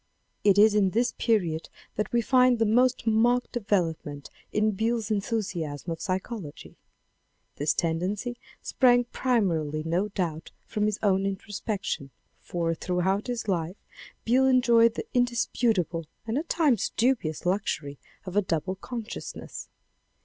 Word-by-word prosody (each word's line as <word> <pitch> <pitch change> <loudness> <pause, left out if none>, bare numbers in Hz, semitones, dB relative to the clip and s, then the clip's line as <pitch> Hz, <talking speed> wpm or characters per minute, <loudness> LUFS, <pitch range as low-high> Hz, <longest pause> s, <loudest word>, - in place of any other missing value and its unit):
It 200 -1 +5
is 215 +1 +7
in 205 -2 +3
this 235 +5 +1
period 175 -9 0 0.3
that 210 - -2
we 235 -1 +2
find 255 0 +4
the 225 - +2
most 250 +3 +2
marked 235 +3 +2
development 170 - -2 0.2
in 215 +1 +2
Beyle's 220 +1 -1
enthusiasm 190 -8 -2
of 165 0 -5
psy 185 -2 0
chology. 190 -7 -8 0.8
This 150 +2 +1
tendancy 185 +9 -1 0.3
sprang 245 -2 +4
primarily 175 - 0
no 170 +5 0
doubt 165 -5 -3 0.2
from 210 0 -1
his 210 -1 -1
own 195 -1 +2
introspection. 195 -6 -4 0.3
For 165 -1 -2
throughout 185 +5 -1
his 240 -3 -3
life 175 0 -1 0.5
Beyle 260 +3 +4
enjoyed 235 -3 +5
the - - -4
indisputable 225 -8 +1 0.2
and 225 +1 -2
at 325 - -7
times 280 - +2
dubious 225 - +1
luxury 165 -7 -1 0.3
of 185 0 -6
a 205 - +5
double 185 +1 -2
consciousness. 230 +2 -7
205 Hz, 135 wpm, -27 LUFS, 175-235 Hz, 0.8 s, is